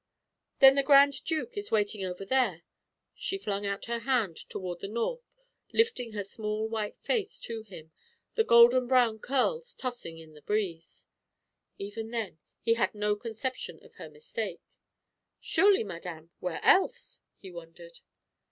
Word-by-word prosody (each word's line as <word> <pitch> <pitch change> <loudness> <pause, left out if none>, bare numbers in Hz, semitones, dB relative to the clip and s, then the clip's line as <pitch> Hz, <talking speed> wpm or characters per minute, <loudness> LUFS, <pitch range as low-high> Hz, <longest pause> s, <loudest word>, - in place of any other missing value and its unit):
"Then 270 0 +10
the 275 - +2
Grand 280 0 +5
Duke 325 +9 -2
is 410 0 -4
waiting 210 -2 +1
over 185 +1 -5
there?" 215 -9 +1 0.5
she 390 - -3
flung 205 - -3
out 200 0 -3
her 235 0 -2
hand 230 -9 +1
toward 180 -2 -5
the - - -5
north, 480 - -4 0.4
lifting 260 - +1
her 205 -1 -3
small 215 +2 -3
white 220 -2 -3
face 430 -4 -1
to 230 -1 -5
him, 180 -7 -12 0.4
the 450 - +3
golden 240 - +6
brown 240 -4 +3
curls 470 - 0
tossing 240 -10 -5
in 160 -1 -13
the 150 - -15
breeze. 175 -3 -3 0.7
Even 210 +3 -6
then 225 -8 -4 0.2
he 230 - +3
had 230 -1 0
no 210 0 +1
conception 230 +4 -5
of - - -18
her - - -9
mistake. 455 +1 -6 0.8
"Surely, 400 - +4
madame; 170 -4 -8
where 180 -3 -4
else?" 380 - +3 0.2
he 190 - -11
wondered. 170 0 -12
220 Hz, 150 wpm, -29 LUFS, 190-265 Hz, 0.8 s, Then